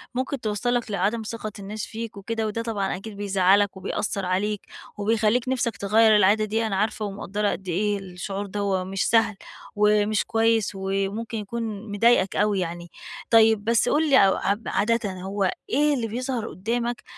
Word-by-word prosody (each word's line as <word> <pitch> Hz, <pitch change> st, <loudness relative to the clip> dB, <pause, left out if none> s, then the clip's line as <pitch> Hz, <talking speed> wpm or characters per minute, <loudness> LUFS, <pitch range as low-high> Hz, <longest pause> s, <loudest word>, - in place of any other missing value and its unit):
ممكن 260 Hz, +1 st, -2 dB
توصلك 230 Hz, +2 st, -1 dB
لعدم 205 Hz, +4 st, 0 dB
ثقة 215 Hz, 0 st, -5 dB
الناس 205 Hz, +2 st, -5 dB
فيك 225 Hz, -1 st, -7 dB
وكده، 220 Hz, +2 st, -3 dB
وده 215 Hz, +2 st, -3 dB
طبعًا 210 Hz, -4 st, -2 dB
أكيد 200 Hz, +2 st, -9 dB
بيزعلك، 200 Hz, 0 st, +2 dB
وبيأثر 200 Hz, +1 st, -3 dB
عليك، 195 Hz, +3 st, -1 dB, 0.4 s
وبيخليك 220 Hz, +3 st, +1 dB
نفسك 235 Hz, -5 st, -1 dB
تغير 215 Hz, +2 st, +4 dB
العادة 210 Hz, +2 st, +4 dB
دي، 220 Hz, +2 st, -1 dB
أنا 200 Hz, -, -2 dB
عارفة 215 Hz, +2 st, -1 dB
ومقدرة 205 Hz, +1 st, -2 dB
قد 190 Hz, -, -6 dB
إيه 200 Hz, +3 st, 0 dB
الشعور 195 Hz, +2 st, -5 dB
دَوَّة 200 Hz, -1 st, -1 dB
مش 190 Hz, +1 st, -1 dB
سهل، 225 Hz, -2 st, +3 dB, 0.4 s
ومش 210 Hz, 0 st, +3 dB
كويس، 225 Hz, -1 st, +2 dB
وممكن 195 Hz, +4 st, -2 dB
يكون 215 Hz, 0 st, -5 dB
مضايقك 205 Hz, -2 st, +3 dB
أوي 205 Hz, -1 st, +2 dB
يعني. 175 Hz, -1 st, -4 dB, 0.4 s
طيب، 220 Hz, -2 st, +5 dB
بس 230 Hz, +2 st, +2 dB
قُل 310 Hz, +1 st, +2 dB
لي 265 Hz, -8 st, +6 dB
أو -, -, +2 dB
عاد 205 Hz, +3 st, -2 dB
عادةً 220 Hz, 0 st, 0 dB
هو 195 Hz, 0 st, -1 dB, 0.2 s
إيه 295 Hz, +3 st, +3 dB
اللي 240 Hz, -5 st, -1 dB
بيظهر 245 Hz, 0 st, -3 dB
قدامك؟ 235 Hz, +4 st, -3 dB
210 Hz, 160 wpm, -24 LUFS, 195-230 Hz, 0.4 s, لي